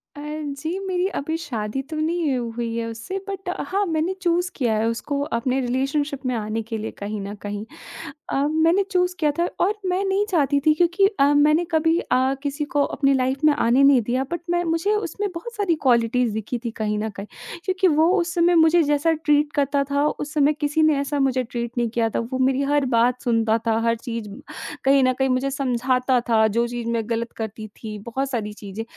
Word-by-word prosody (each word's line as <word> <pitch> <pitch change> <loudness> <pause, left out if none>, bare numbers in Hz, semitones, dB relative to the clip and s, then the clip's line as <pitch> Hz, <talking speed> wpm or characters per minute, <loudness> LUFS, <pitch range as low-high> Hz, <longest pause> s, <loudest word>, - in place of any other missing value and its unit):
अ, - - -9 0.4
जी 330 +4 -2
मेरी 375 -1 -1
अभी 315 +3 -2
शादी 245 -5 -4
तो 315 - -5
नहीं 310 -3 0
हुई 235 -1 -3
है 230 0 -2
उससे 230 +13 -5
बट 390 0 -5 0.2
हाँ 400 +2 0
मैंने 325 +1 0
चूज़ 350 0 +1
किया 240 -5 0
है 225 +1 +1
उसको 280 +5 -2 0.2
अपने 255 +3 0
रिलेशनशिप 275 +3 -1
में 255 - 0
आने 220 0 -2
के 225 0 -5
लिए 220 +1 -5
कहीं 210 +1 -5
न 200 +1 -5
कहीं। 205 +1 -5 0.6
अ, - - -2 0.2
मैंने 330 +5 +3
चूज़ 360 -1 +1
किया 300 -2 +2
था 345 - +2 0.2
और 410 - +1 0.2
मैं 370 +2 0
नहीं 390 +2 +1
चाहती 285 -4 +2
थी 310 - +6
क्योंकि 350 +4 +3
अ, 275 - +6
मैंने 305 +4 +4
कभी 325 +1 +3
अ, 260 +1 +1
किसी 290 +1 -2
को 290 0 +1
अपनी 275 -1 +1
लाइफ़ 265 +1 0
में 300 - +6
आने 265 -1 +3
नहीं 275 -3 +6
दिया 250 +4 -1
बट 345 - -3
मैं 350 0 +1
मुझे 335 +5 0
उसमें 415 -1 -2
बहुत 470 +8 -7
सारी 395 -5 +1
क्वालिटीज़ 240 -2 +2
दिखी 220 +3 -3
थी 230 - -2
कहीं 210 -1 -1
न 220 +1 -2
कहीं, 200 0 -8 0.4
क्योंकि 375 0 +2
वो 320 +1 +4
उस 350 +1 -2
समय 345 0 +4
मुझे 325 +1 +5
जैसा 295 +3 +2
ट्रीट 295 -1 +1
करता 280 0 +1
था 285 +1 +2
उस 295 +1 -4
समय 295 0 +3
किसी 295 +1 0
ने 310 -2 +4
ऐसा 280 +1 -2
मुझे 260 -2 +1
ट्रीट 235 0 -4
नहीं 235 -1 +1
किया 230 -1 0
था। - - -2
वो 260 - -1
मेरी 265 +1 +2
हर 290 -2 +2
बात 245 +2 +2
सुनता 225 -2 +2
था 225 0 +2
हर 230 0 +3
चीज़ 230 -2 -6 0.6
कहीं 270 0 +4
न 255 0 +3
कहीं 265 +1 0
मुझे 255 +2 +1
समझाता 255 -1 +1
था 220 -1 +4
जो 235 +3 0
चीज़ 240 -1 -5
मैं 230 -1 -1
ग़लत 230 0 -2
करती 220 -1 -5
थी 215 0 -8
बहुत 260 +5 -3
सारी 215 -4 -3
चीज़ें। 210 +1 -7
275 Hz, 215 wpm, -23 LUFS, 230-320 Hz, 0.6 s, थी